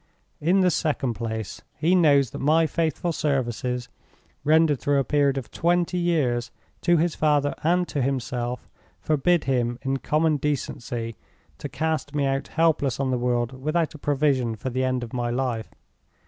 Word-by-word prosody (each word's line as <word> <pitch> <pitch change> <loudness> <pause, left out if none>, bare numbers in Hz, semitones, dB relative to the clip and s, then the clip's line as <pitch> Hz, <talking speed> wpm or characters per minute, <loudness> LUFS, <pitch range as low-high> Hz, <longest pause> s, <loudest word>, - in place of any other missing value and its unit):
In 180 +6 +3
the 180 -1 +4
second 150 -6 0
place, 110 -2 -5 0.2
he 165 +5 +2
knows 145 -8 +4
that - - -6
my 160 +4 +3
faithful 165 +1 -1
services, 125 -5 -1 0.6
rendered 155 -2 +4
through 145 0 +1
a 135 - +3
period 140 -1 +2
of 130 - -5
twenty 175 +1 +1
years, 130 -9 +1 0.3
to 175 0 +3
his 165 +1 +1
father 145 -2 +2
and 175 +2 +2
to 145 - -1
himself, 125 -2 -2 0.3
forbid 155 +3 +2
him, 120 -2 0
in 135 0 0
common 155 +2 +1
decency, 120 -5 -3 0.4
to - - -5
cast 155 -1 -2
me 145 -1 +1
out 135 0 -1
helpless 160 -6 +1
on 135 -1 0
the 125 - 0
world 125 +1 -1
without 155 +3 0
a 155 - -11
provision 140 -5 +1
for 130 +4 -5
the 130 +2 -1
end 130 -1 0
of 115 - -8
my 120 -1 -1
life. 120 -2 -2
140 Hz, 165 wpm, -25 LUFS, 125-160 Hz, 0.6 s, the